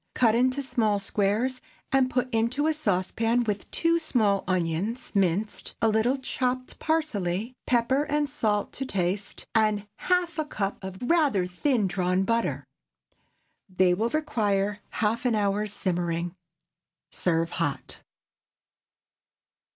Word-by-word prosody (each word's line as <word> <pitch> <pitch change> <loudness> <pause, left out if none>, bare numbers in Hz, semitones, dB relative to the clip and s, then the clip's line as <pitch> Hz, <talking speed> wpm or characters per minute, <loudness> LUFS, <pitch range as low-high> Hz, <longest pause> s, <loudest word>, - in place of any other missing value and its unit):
Cut 230 -4 +4
into 255 +4 +2
small 230 -5 +1
squares, 210 +6 0 0.3
and 265 -1 +3
put 250 0 0
into 235 +6 +1
a 315 - +3
saucepan, 225 -1 +1
with 205 -3 -3
two 335 0 +2
small 220 -11 +1
onions, 185 +7 -1
minced; 200 +1 0
a 225 - +3
little 220 +5 +2
chopped 255 -1 -2
parsley, 230 - -1
pepper 255 +4 +2
and 295 0 0
salt 210 -5 -1
to 270 - -3
taste, 195 -1 -2
and 215 -2 +2
half 355 -3 0
a 310 - 0
cup 200 -8 -3
of 190 0 -6
rather 275 - +3
thin 210 +6 0
drawn 185 0 +1
butter. 190 - 0 1.0
They 185 -1 +3
will 220 +6 0
require 210 -9 0 0.3
half 225 +3 0
an 245 -3 +2
hour's 205 0 0
simmering. 175 -3 -1 0.8
Serve 165 -2 0
hot. - - -3
220 Hz, 125 wpm, -27 LUFS, 195-255 Hz, 1.0 s, Cut